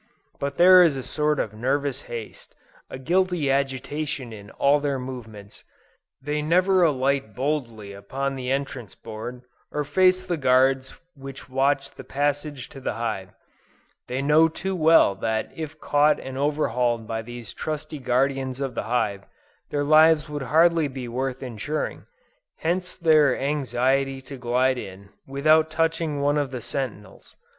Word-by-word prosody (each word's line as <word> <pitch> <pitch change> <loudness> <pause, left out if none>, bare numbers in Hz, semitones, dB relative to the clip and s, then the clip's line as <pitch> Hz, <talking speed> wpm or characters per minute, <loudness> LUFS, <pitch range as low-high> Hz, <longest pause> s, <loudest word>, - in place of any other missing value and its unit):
But 140 0 -3
there 185 +1 +8
is 160 -6 +4
a 130 - -5
sort 150 +1 0
of 105 - -2
nervous 135 +4 -1
haste, 115 -3 -8 0.3
and 130 0 -9
guilty 180 -4 +1
agitation 135 -1 -2
in 100 -1 -11
all 140 +5 +2
their 140 -1 -1
movements: 110 -6 -9 0.6
they 150 +3 -2
never 185 +4 +3
alight 135 -7 +1
boldly 120 -7 -3
upon 135 +8 -4
the 125 -1 -5
entrance 135 -5 -3
board, 115 +3 -8 0.3
or 150 - -1
face 185 +5 +3
the 175 -2 -2
guards 130 -1 +2
which 135 -2 -10
watch 135 +1 +1
the - - -11
passage 145 -1 -2
to 135 - -11
the - - -2
hive; 110 -5 -3 0.8
they 130 +2 -2
know 155 +3 +5
too 190 +4 -4
well 160 - +5
that 110 +3 -2
if 155 -1 -7
caught 145 +1 +3
and 130 0 -7
overhauled 125 -5 0
by 110 0 -3
these 120 0 -9
trusty 155 -1 -5
guardians 130 +1 0
of 135 -2 -3
the - - -4
hive, 105 -5 -1 0.4
their 145 0 -1
lives 155 +1 +5
would 150 -1 -5
hardly 165 0 +4
be 130 -2 -7
worth 130 +2 -3
insuring; 130 +5 -4 0.5
hence 180 +2 -1
their 155 -6 +4
anxiety 135 -1 0
to 135 +1 -10
glide 125 +1 +1
in, 100 -1 -10 0.2
without 155 +3 +3
touching 160 -2 -1
one 145 +1 +2
of 145 -2 -1
the 130 -1 -5
sentinels. 120 -3 -6
135 Hz, 150 wpm, -24 LUFS, 125-150 Hz, 0.8 s, there